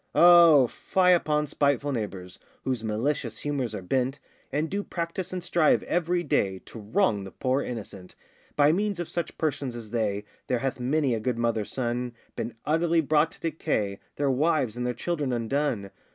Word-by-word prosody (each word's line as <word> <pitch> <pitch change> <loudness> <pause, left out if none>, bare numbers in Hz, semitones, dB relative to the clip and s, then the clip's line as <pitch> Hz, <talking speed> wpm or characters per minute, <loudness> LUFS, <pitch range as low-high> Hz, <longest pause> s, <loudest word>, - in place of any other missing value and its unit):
O 170 -5 +8
fie 180 +9 +2
upon 150 -3 +1
spiteful 145 -1 +1
neighbours, 100 -7 -5 0.2
Whose 125 -4 -2
malicious 115 +1 -1
humours 135 -7 -2
are 95 - -6
bent, 130 +7 0 0.3
And 150 +3 0
do 200 +4 -2
practise 170 +1 -4
and 180 -1 -4
strive 170 -3 +3
every 175 0 0
day 100 - +1
To 115 - -10
wrong 105 - +1
the 95 - -7
poor 130 +7 0
innocent. 100 -7 -7 0.4
By 145 0 +5
means 200 +2 0
of 175 - -3
such 170 - -4
persons 140 -5 -2
as 115 -3 -8
they, 105 -3 -1 0.2
There 125 - +1
hath 130 +1 -2
many 135 +1 +1
a 115 - -1
good 120 +2 -1
mother's 115 -3 -1
son 120 -1 -2 0.2
Been 115 - -4
utterly 165 +2 +2
brought 155 +1 +2
to - - -17
decay, 145 -11 -2 0.2
Their 140 -1 +1
wives 140 -4 +1
and 125 0 -2
their 125 - -2
children 150 -6 -2
undone. 120 -4 -1
135 Hz, 175 wpm, -27 LUFS, 115-160 Hz, 0.4 s, O